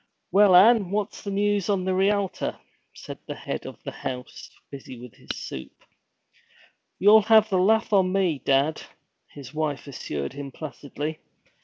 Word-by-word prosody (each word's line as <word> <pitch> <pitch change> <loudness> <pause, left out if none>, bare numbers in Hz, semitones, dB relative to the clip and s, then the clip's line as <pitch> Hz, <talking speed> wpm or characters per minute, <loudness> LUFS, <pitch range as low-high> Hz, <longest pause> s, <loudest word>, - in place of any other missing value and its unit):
'Well, 195 0 +6
an' 205 0 +6
what's 205 +2 -3
the 205 - -6
news 205 -1 0
on 195 -3 0
the 190 - 0
Rialter?' 195 0 0 0.3
said - - -10
the - - -5
head - - -6
of - - -11
the - - -5
house, 125 -1 -7 0.2
busy 135 -2 -9
with 125 -2 -11
his - - -21
soup. 65 - -7 1.3
'You'll 210 +3 +7
have 220 0 +5
the 185 - +2
laugh 220 +3 +2
on 190 -2 +3
me, 185 -6 +1
dad,' 140 +4 +1 0.5
his 140 -1 -12
wife 155 -2 -2
assured 75 - -5
him 140 -1 -7
placidly. 150 +1 -6
185 Hz, 155 wpm, -25 LUFS, 140-205 Hz, 1.3 s, You'll